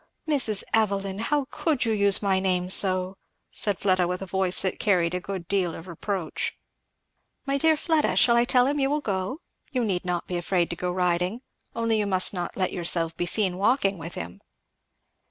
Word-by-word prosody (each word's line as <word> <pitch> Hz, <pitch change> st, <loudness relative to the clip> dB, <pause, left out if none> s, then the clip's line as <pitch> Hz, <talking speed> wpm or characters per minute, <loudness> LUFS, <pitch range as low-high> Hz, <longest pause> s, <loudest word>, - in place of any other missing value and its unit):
"Mrs. 250 Hz, -9 st, +2 dB
Evelyn, 200 Hz, -3 st, 0 dB
how 285 Hz, +5 st, 0 dB
could 300 Hz, -7 st, 0 dB
you 225 Hz, -, 0 dB
use 200 Hz, -1 st, +2 dB
my 190 Hz, -2 st, +2 dB
name 185 Hz, -1 st, 0 dB
so!" 185 Hz, 0 st, +3 dB, 0.3 s
said 205 Hz, -3 st, -1 dB
Fleda 185 Hz, -3 st, +2 dB
with 180 Hz, +2 st, -3 dB
a -, -, -5 dB
voice 190 Hz, 0 st, +2 dB
that 190 Hz, -, -2 dB
carried 180 Hz, -4 st, +2 dB
a 180 Hz, -, -1 dB
good 185 Hz, -2 st, -6 dB
deal 185 Hz, -4 st, 0 dB
of 165 Hz, -, -10 dB
reproach. 180 Hz, -1 st, -4 dB, 0.9 s
"My 275 Hz, 0 st, 0 dB
dear 320 Hz, +1 st, +3 dB
Fleda, 315 Hz, -1 st, +1 dB
shall 235 Hz, -, +5 dB
I 235 Hz, -, +4 dB
tell 250 Hz, 0 st, +4 dB
him 290 Hz, +2 st, 0 dB
you 270 Hz, 0 st, +1 dB
will 295 Hz, +1 st, 0 dB
go? 200 Hz, -, -3 dB, 0.3 s
You 250 Hz, -3 st, -1 dB
need 185 Hz, -4 st, -1 dB
not 180 Hz, -1 st, -2 dB
be 180 Hz, -, -3 dB
afraid 175 Hz, 0 st, 0 dB
to -, -, -3 dB
go 180 Hz, +1 st, -3 dB
riding, 180 Hz, +4 st, 0 dB, 0.3 s
only 230 Hz, -1 st, 0 dB
you 205 Hz, -, 0 dB
must 185 Hz, 0 st, +3 dB
not 175 Hz, -2 st, -4 dB
let 185 Hz, -2 st, -1 dB
yourself 170 Hz, -2 st, 0 dB
be 175 Hz, -, -2 dB
seen 190 Hz, -2 st, 0 dB
walking 200 Hz, -3 st, +1 dB
with 165 Hz, +1 st, -7 dB
him." 85 Hz, +2 st, -7 dB
190 Hz, 195 wpm, -25 LUFS, 180-225 Hz, 0.9 s, shall